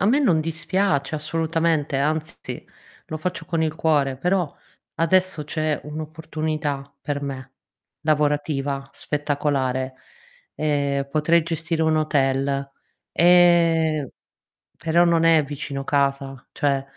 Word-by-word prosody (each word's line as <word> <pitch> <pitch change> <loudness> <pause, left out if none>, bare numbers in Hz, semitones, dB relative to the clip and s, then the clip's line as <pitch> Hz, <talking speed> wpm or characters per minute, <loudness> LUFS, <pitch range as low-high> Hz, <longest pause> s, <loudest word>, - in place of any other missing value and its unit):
a - - +1
me 250 +7 +4
non 180 - +3
dispiace 165 -1 0
assolutamente, 160 -1 0
anzi 155 +3 -3 0.4
lo 155 - -4
faccio 180 +3 -4
con 165 -2 0
il 155 -1 0
cuore, 145 -5 +1
però 180 0 0 0.4
adesso 185 0 +2
c'è 155 0 -1
un'opportunità 155 -2 -4
per 145 -1 -2
me, 135 -1 -6 0.5
lavorativa, 145 -2 0
spettacolare. 140 -3 -1 0.6
Ehm, 140 -2 0
potrei 165 +3 +3
gestire 165 0 -2
un 160 0 +3
hotel, 140 -2 0 0.4
ehm, 165 -4 +4 0.7
però 170 +2 +3
non 170 -1 +3
è 165 -2 +5
vicino 140 -1 -5
casa, 140 -2 -1
cioè, 140 -2 0
155 Hz, 110 wpm, -23 LUFS, 140-165 Hz, 0.7 s, è